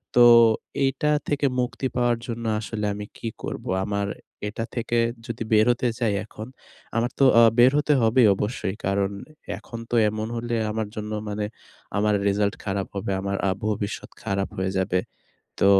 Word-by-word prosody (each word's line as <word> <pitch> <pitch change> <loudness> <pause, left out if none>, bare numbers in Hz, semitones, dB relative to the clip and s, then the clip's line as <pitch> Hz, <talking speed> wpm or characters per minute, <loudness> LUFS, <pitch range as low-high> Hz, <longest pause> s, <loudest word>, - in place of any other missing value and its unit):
তো 120 - +8 0.6
এইটা 135 +3 +1 0.2
থেকে 145 -1 0
মুক্তি 125 +2 -1
পাওয়ার 120 -1 +2
জন্য 115 -1 -4
আসলে 105 -1 -4
আমি 105 0 -6
কী - - -5 0.2
করবো? - - -5 0.2
আমার 100 -1 -1 0.4
এটা 115 +2 -4
থেকে 120 0 -1 0.3
যদি 115 -1 -4
বের 110 0 +6
হতে 120 +1 0
চাই 115 -4 +1
এখন, 110 +1 -9 0.5
আমার 120 +2 +1
তো 135 - +6
আ - - +8 0.2
বের 125 +2 +7
হতে 150 0 +3
হবেই 115 +1 +5
অবশ্যই। 105 -2 -2
কারণ 100 0 +1 0.5
এখন 115 - -9
তো 120 - 0
এমন 110 +1 -3
হলে 120 0 -2 0.2
আমার 110 -1 -2
জন্য 105 0 -5 0.2
মানে 105 0 -2 0.5
আমার 105 +1 +2
রেজাল্ট 100 0 +1
খারাপ 100 -1 -2
হবে, 100 0 -2
আমার 100 0 -2
আ - - +3 0.2
ভবিষ্যৎ 105 -1 -3
খারাপ 100 0 -1
হয়ে 95 0 -1
যাবে। 95 -1 +1 0.6
তো - - +5
110 Hz, 165 wpm, -24 LUFS, 100-120 Hz, 0.6 s, তো